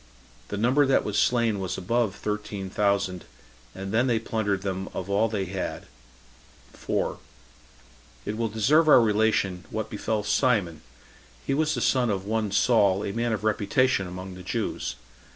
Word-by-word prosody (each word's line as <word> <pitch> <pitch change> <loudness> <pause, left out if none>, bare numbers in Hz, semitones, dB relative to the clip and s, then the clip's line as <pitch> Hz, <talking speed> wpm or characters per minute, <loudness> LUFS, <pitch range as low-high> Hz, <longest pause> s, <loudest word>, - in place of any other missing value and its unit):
The - - -4
number 130 +6 +3
that 135 - +3
was 105 0 0
slain 115 -4 +2
was 95 -2 -3
above 110 +1 0
thirteen 105 -3 -4
thousand, 100 -3 0 0.5
and 95 0 -6
then 120 +4 +2
they 120 -2 +2
plundered 105 -3 -2
them 95 -1 -3
of 95 +2 -4
all 105 +3 +3
that 110 - -3
they 95 - -1
had. 95 0 -5 0.9
4. - - -2 1.1
It 105 - -3
will 115 0 -1
deserve 135 +10 +3
our - - +9
relation 105 -5 +1
what 110 0 -4
befell 105 0 -2
Simon; 100 -10 +1 0.6
he 135 - 0
was 155 +2 +1
the 125 - -3
son 125 -1 +2
of 95 -2 -2
one 110 0 -1
Saul, 100 -2 +3
a - - -2
man 115 0 -1
of 105 -2 -2
reputation 110 0 +1
among 90 +1 -7
the 90 - -10
Jews. - - -3
105 Hz, 165 wpm, -26 LUFS, 95-115 Hz, 1.1 s, our